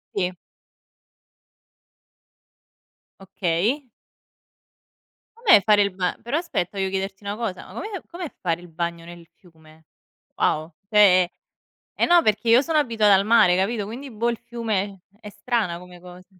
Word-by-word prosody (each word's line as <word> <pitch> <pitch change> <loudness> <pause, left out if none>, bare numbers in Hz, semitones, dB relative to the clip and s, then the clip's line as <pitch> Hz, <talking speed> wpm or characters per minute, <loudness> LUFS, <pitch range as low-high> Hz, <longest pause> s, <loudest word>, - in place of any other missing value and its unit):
Sì. 185 -2 -1 2.9
Okay. 195 - -1 1.5
Com'è 455 - +6
fare 210 0 +4
il 200 0 +1
ba 185 -1 -2
però 240 +6 -2
aspetta 205 - -3
devo 190 -1 0
chiederti 195 +1 -4
una 200 0 -4
cosa, 215 -5 -5
ma - - -14
com'è 415 -3 -6
com'è 345 -3 -7
fare 170 -1 -2
il 175 - -13
bagno 170 0 -4
nel 170 -1 -12
fiume? 160 -3 -21 0.5
Wow, 155 +2 0 0.2
cioè 200 -4 +6 0.7
è - - -4
eh, - - +2
no 345 0 +5
perché 215 0 0
io 235 +3 +6
sono 315 +1 0
abituata 225 -7 +3
al 195 +1 +2
mare, 215 -5 +5
capito? 205 +3 -1
Quindi, 250 +7 -8
boh, 235 +1 -1
il 235 - -4
fiume 205 -6 -4 0.2
è 210 - -10
strana 210 -4 -2
come 180 0 -14
cosa. 180 +1 -13
200 Hz, 145 wpm, -23 LUFS, 180-235 Hz, 2.9 s, Com'è